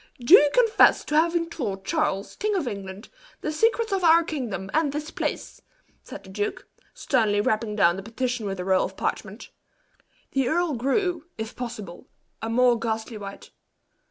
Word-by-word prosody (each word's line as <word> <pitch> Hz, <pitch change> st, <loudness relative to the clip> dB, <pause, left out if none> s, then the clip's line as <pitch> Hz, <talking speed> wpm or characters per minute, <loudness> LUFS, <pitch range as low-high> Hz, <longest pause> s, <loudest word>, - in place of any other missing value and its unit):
"Do 245 Hz, +8 st, +2 dB
you 295 Hz, -7 st, +9 dB
confess 460 Hz, -3 st, +4 dB
to 300 Hz, -, -2 dB
having 335 Hz, +1 st, +2 dB
told 205 Hz, -, -5 dB
Charles, 195 Hz, +1 st, -1 dB
King 420 Hz, 0 st, -1 dB
of 340 Hz, -9 st, -1 dB
England, 195 Hz, -1 st, -7 dB, 0.3 s
the 305 Hz, -, -2 dB
secrets 455 Hz, +6 st, +1 dB
of 380 Hz, -2 st, 0 dB
our 335 Hz, 0 st, +6 dB
kingdom 220 Hz, -, -5 dB
and 310 Hz, -2 st, +2 dB
this 300 Hz, +2 st, -5 dB
place?" -, -, -4 dB, 0.4 s
said -, -, -10 dB
the 190 Hz, -, -14 dB
duke, 205 Hz, +1 st, -4 dB, 0.3 s
sternly 220 Hz, -6 st, +1 dB
rapping 215 Hz, +1 st, 0 dB
down 175 Hz, -3 st, +3 dB
the -, -, -5 dB
petition 235 Hz, +1 st, -3 dB
with 195 Hz, -1 st, -4 dB
a 180 Hz, -, -4 dB
roll 190 Hz, -1 st, +3 dB
of -, -, -9 dB
parchment. -, -, -4 dB, 0.8 s
The 270 Hz, -2 st, +1 dB
earl 340 Hz, +2 st, +1 dB
grew, 315 Hz, -, -1 dB
if 220 Hz, +1 st, -6 dB
possible, 215 Hz, -7 st, -7 dB, 0.3 s
a 225 Hz, -, -3 dB
more 240 Hz, 0 st, +3 dB
ghastly 225 Hz, 0 st, -3 dB
white. 200 Hz, -1 st, -9 dB
245 Hz, 170 wpm, -25 LUFS, 205-320 Hz, 0.8 s, you